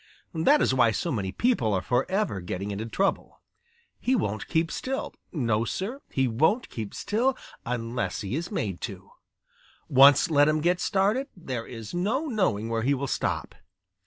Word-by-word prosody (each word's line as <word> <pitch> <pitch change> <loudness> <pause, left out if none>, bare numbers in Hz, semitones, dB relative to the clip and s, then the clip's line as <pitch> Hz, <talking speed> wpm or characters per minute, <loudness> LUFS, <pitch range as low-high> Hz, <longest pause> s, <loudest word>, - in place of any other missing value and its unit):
That 170 - +4
is - - +2
why 120 -3 +4
so 165 - -2
many 100 -7 -2
people 120 - +1
are 95 - 0
forever 130 - 0
getting 95 +3 -4
into 105 +3 -4
trouble. 195 - -1 0.6
He 260 - +1
won't 105 - -2
keep 165 0 +1
still. 270 +1 -3 0.2
No, 115 -8 0
Sir, 210 - -4
he 135 -1 +1
won't 160 - +1
keep 110 -3 -6
still 250 +5 0 0.3
unless 120 0 -2
he 105 +4 -3
is 170 +3 -3
made 100 - -3
to. 100 -4 -7 0.8
Once 140 +5 +6
let 145 -1 +5
him 155 0 +2
get 175 +2 +2
started 205 +10 +1
there 130 -9 -5
is 115 -3 -8
no 215 - 0
knowing 185 - 0
where 115 0 -1
he 140 +5 +2
will 140 +1 -3
stop. 135 - -2
135 Hz, 165 wpm, -27 LUFS, -, 0.8 s, Once